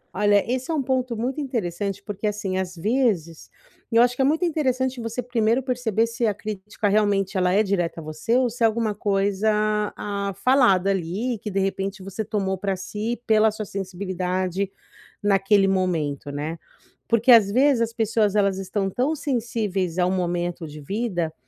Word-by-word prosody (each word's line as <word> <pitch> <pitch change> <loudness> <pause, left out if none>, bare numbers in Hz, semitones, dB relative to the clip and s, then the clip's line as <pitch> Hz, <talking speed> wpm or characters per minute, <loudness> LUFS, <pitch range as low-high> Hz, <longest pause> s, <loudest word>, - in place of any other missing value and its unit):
olha, 205 -1 +4
esse 255 +2 -2
é 325 - 0
um 295 - +1
ponto 255 -3 -1
muito 255 +6 -2
interessante 200 - -3
porque, 205 +1 -4
assim, 200 -3 -2
às 185 -1 -4
vezes, 195 - 0 0.4
eu 230 - +4
acho 245 0 +4
que 270 - -1
é - - +5
muito 320 +6 +2
interessante 260 -5 0
você 230 +2 -4
primeiro 235 +1 +1
perceber 240 -4 0
se 230 0 -1
a 205 - 0
crítica 210 0 -4
realmente 200 -1 +2
ela 180 -1 +2
é 205 +3 +4
direta 175 -5 -1
a - - -8
você 155 +11 -1
ou 255 - +3
se 240 +1 -8
é 225 - +7
alguma 220 -1 0
coisa, 200 +1 +1 0.5
ah, 200 -1 -3
falada 215 -8 +4
ali 195 +6 -2
que 210 - -4
de 195 0 -1
repente 195 0 -2
você 195 +3 -4
tomou 190 -2 -2
para 195 -1 -1
si 210 +5 -4
pela 220 -1 +4
sua 215 0 -5
sensibilidade 185 0 -3 0.5
naquele 195 0 +3
momento, 165 -7 -1
né. 155 +3 -4 0.5
Porque, 230 +2 +4
às 210 -4 +7
vezes, 260 0 +3
as 230 - 0
pessoas 220 -2 +1
elas 195 -2 +2
estão 195 +1 -2
tão 270 +9 0
sensíveis 220 - -2
a 180 - +4
um 180 - +1
momento 175 -2 -2
de 150 +1 -10
vida, 180 -3 -2
205 Hz, 180 wpm, -24 LUFS, 190-235 Hz, 0.5 s, é